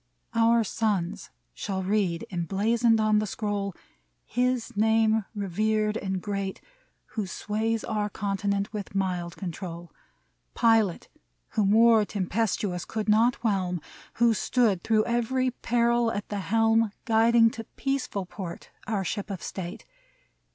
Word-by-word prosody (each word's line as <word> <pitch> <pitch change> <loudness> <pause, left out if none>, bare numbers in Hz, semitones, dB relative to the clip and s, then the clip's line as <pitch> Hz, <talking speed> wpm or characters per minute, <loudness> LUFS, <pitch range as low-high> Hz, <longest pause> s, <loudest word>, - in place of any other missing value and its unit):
Our 230 0 +4
sons 205 -5 -1 0.2
shall 190 - -3
read, 185 -4 0
emblazoned 220 +6 +2
on 215 -1 +3
the 215 - -1
scroll. 200 -2 -3 0.5
His 250 -1 -1
name 220 0 +3
revered 210 +2 0
and 190 -3 -2
great. 195 0 -3 0.5
Who 215 -4 -3
sways 220 +4 -2
our 210 -1 -1
continent 200 0 -2
with 200 -2 -6
mild 180 -3 -1
control: 175 -2 -6 0.6
Pilot 225 -6 +3 0.4
whom 205 -2 +1
war 225 +1 +6
tempestuous 200 -2 -1
could 220 -1 -4
not 230 +3 +4
whelm, 185 -5 0 0.4
Who 235 -1 +4
stood 215 -3 +1
through 215 +1 +2
every 245 +2 0
peril 235 -1 +1
at 205 -1 -4
the 205 - -2
helm. 225 +2 +3 0.2
Guiding 230 0 +5
to 225 - -7
peaceful 270 -8 -2
port 180 -2 -8 0.2
our 205 -3 0
Ship 205 +3 -3
of 195 -3 -5
State. 180 -2 -6
210 Hz, 125 wpm, -27 LUFS, 195-225 Hz, 0.6 s, war